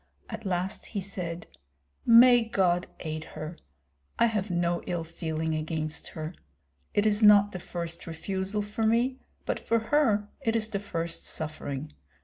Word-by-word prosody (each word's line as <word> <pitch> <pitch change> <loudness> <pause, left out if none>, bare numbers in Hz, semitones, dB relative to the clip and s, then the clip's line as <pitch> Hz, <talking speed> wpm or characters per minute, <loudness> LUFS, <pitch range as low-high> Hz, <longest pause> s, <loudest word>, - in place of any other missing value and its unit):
At - - -5
last 185 +1 -2
he 210 - -3
said, 180 -3 -4 0.6
"May 240 +1 +8
God 185 -5 +1
aid 155 -1 -4
her! 155 +2 -8 0.6
I - - +5
have 215 -3 0
no 175 -1 0
ill 175 -2 -1
feeling 160 -1 -3
against 155 0 -2
her! 155 +2 -6 0.6
It 205 - +3
is 210 0 +3
not 205 -1 +7
the 180 - -5
first 170 -1 -5
refusal 190 +5 -2
for 215 +2 -1
me, 245 +4 +2 0.3
but - - -1
for 230 - +1
her 225 -3 +2
it 225 0 0
is 220 -1 +1
the 200 -2 -2
first 170 -4 -4
suffering. 150 -2 -4
185 Hz, 150 wpm, -28 LUFS, 165-215 Hz, 0.6 s, May